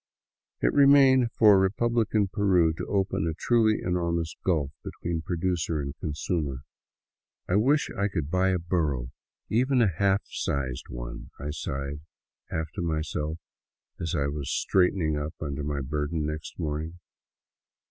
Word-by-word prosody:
It - - +2
remained 135 -4 +6
for 105 -4 +6
republican 110 +1 +1
Peru 95 -5 +3
to - - -6
open 95 -5 0
a 80 - -2
truly 110 0 +2
enormous 85 -2 -1
gulf 75 -7 +1
between 85 -1 -4
producer 85 -2 -1
and 70 0 -4
consumer. 75 -3 -2 0.4
" - - -63
I 90 - +2
wish 140 +8 +2
I 100 +1 +1
could 80 -7 -3
buy 95 +1 +3
a 95 - +2
burro, 75 -8 -1 0.4
even 130 +4 +2
a 115 - +5
half 100 +2 +2
size 65 -3 -2
one," - - -7
I 75 +2 -4
sighed, 70 -1 -4 0.5
half 80 0 -3
to - - -5
myself, 80 -1 -2 0.6
as 80 0 -2
I 70 -3 +1
was 70 -1 -3
straightening 90 -5 +2
up 75 +1 -5
under 75 -1 -4
my 70 -1 -2
burden 75 +3 -2
next 75 0 -5
morning. 80 +1 -3
85 Hz, 145 wpm, -27 LUFS, 75-100 Hz, 0.6 s, remained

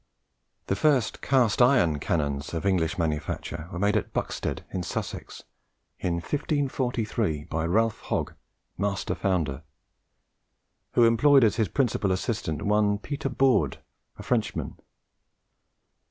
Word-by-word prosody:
The 95 - 0
first 130 0 +2
cast 125 -5 +2
iron 120 - +4
cannons 70 0 -2
of 80 - -3
English 85 -5 +1
manufacture 80 0 -3
were 90 - -5
made 100 +3 +2
at - - -1
Buxtead, - - -3
in 95 - -2
Sussex, 90 - -5 0.6
in 85 -2 -1
1543, 120 - -1
by 80 +1 -2
Ralph 110 +5 +1
Hogge, - - -2 0.5
master 100 -1 -1
founder, 80 -8 -1 1.3
who 120 - +5
employed 130 +4 +5
as 110 - +3
his 110 -3 +2
principal 105 - 0
assistant 95 -5 -2
one 105 0 +2
Peter 140 +5 -4
Baude, 125 - +2 0.4
a - - -9
Frenchman. - - -2
100 Hz, 120 wpm, -26 LUFS, 85-120 Hz, 1.3 s, who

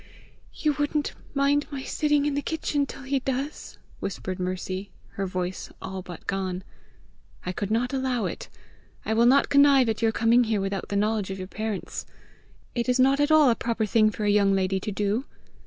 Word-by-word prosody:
"You 305 -2 +1
wouldn't 290 0 0 0.2
mind 280 +1 +2
my 275 -3 -5
sitting 295 0 +1
in 295 - +1
the 285 - 0
kitchen 290 -2 -1
till 270 - -9
he 270 0 0
does?" 270 +3 -4 0.2
whispered 185 -1 -4
Mercy, 185 +1 -3 0.2
her 195 -1 -3
voice 185 0 -4
all 190 0 -5
but 175 -2 -10
gone. 190 -1 -2 0.8
"I 180 - -1
could 200 +2 -3
not 240 +4 0
allow 260 -3 0
it. - - -5 0.6
I 220 - 0
will 230 +2 +4
not 275 +3 +5
connive 280 -3 +6
at 220 - -2
your 225 -1 +3
coming 235 +2 +4
here 220 -2 0
without 195 0 -2
the 200 - -2
knowledge 210 -1 +1
of 190 - -4
your 185 -1 -6
parents! 215 -1 -4 0.7
It 240 +1 -1
is 250 +1 +2
not 270 +2 +4
at 290 +1 +3
all 310 -5 +6
a - - +2
proper 230 -2 -1
thing 215 +1 +4
for 210 0 -4
a 205 - +3
young 200 -1 +4
lady 190 0 +1
to 210 - -4
do!" 205 +5 -1
225 Hz, 195 wpm, -26 LUFS, 195-275 Hz, 0.8 s, connive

